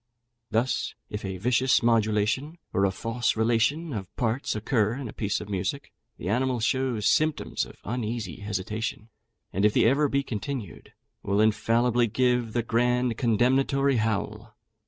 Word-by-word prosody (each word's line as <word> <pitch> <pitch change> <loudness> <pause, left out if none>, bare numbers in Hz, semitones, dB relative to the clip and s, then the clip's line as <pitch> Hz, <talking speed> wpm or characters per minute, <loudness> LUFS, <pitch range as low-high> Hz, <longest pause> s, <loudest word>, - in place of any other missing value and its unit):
Thus, 115 +4 0 0.2
if 105 - -5
a 95 -1 -4
vicious 125 +5 +2
modulation, 115 +6 +1 0.2
or 95 - +3
a 95 - +2
false 115 +4 -1
relation 120 +8 +1
of 95 -4 -4
parts, 120 +1 -1
occur 110 0 +1
in 135 -2 -5
a - - -8
piece 105 -2 -1
of - - -8
music, 105 - -3 0.3
the 85 - -6
animal 125 +4 +1
shows 120 -1 0
symptoms 155 -1 +1
of - - -13
uneasy 110 -6 -3
hesitation; 105 +2 -4 0.4
and 100 - 0
if 105 0 +4
the - - +4
error 140 +5 +3
be 140 0 +1
continued, 115 - -6 0.3
will 100 +1 0
infallibly 115 +2 +3
give 125 0 +1
the 120 - 0
grand 120 +1 +1
condemnatory 130 +3 +2
howl. 110 0 -2
115 Hz, 150 wpm, -26 LUFS, 105-125 Hz, 0.4 s, if